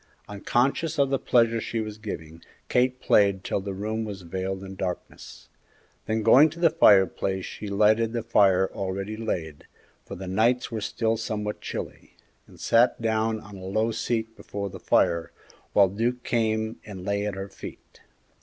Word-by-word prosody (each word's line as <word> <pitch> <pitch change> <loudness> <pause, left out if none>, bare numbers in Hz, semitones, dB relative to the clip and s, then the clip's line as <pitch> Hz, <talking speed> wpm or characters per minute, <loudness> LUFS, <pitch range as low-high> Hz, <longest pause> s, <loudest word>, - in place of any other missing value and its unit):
Unconscious 130 +10 0
of 140 -1 +2
the 135 - +1
pleasure 115 -2 +2
she 115 - -3
was 110 -1 -5
giving, 80 -6 -7 0.3
Kate 125 +1 +2
played 100 -2 +3
till - - -1
the 100 +1 -5
room 110 +3 -3
was 100 -4 -7
veiled 95 +2 -4
in 95 0 -8
darkness; 90 -2 -6 0.6
then 110 0 0
going 145 +8 +7
to 165 +3 -11
the 165 -2 +4
fireplace 95 - +3
she 105 - -7
lighted 110 +3 +3
the 115 -1 -3
fire 95 -4 +3
already 100 +2 -4
laid 85 -9 -4 0.4
for - - -8
the 95 - -7
nights 115 +8 +1
were 110 -2 -3
still 110 +2 -1
somewhat 105 -1 -4
chilly - - -7 0.3
and - - -17
sat 120 +2 +3
down 110 -1 0
on 105 -2 -12
a 95 - -10
low 110 +4 0
seat 115 -1 -2
before 100 -1 -6
the - - -9
fire, 85 0 +1 0.4
while 100 -1 +6
Duke 120 +6 -2
came 110 -1 0
and 95 -3 -9
lay 100 0 -1
at 105 - -3
her 95 0 -5
feet. - - -12
105 Hz, 170 wpm, -26 LUFS, 95-115 Hz, 0.6 s, going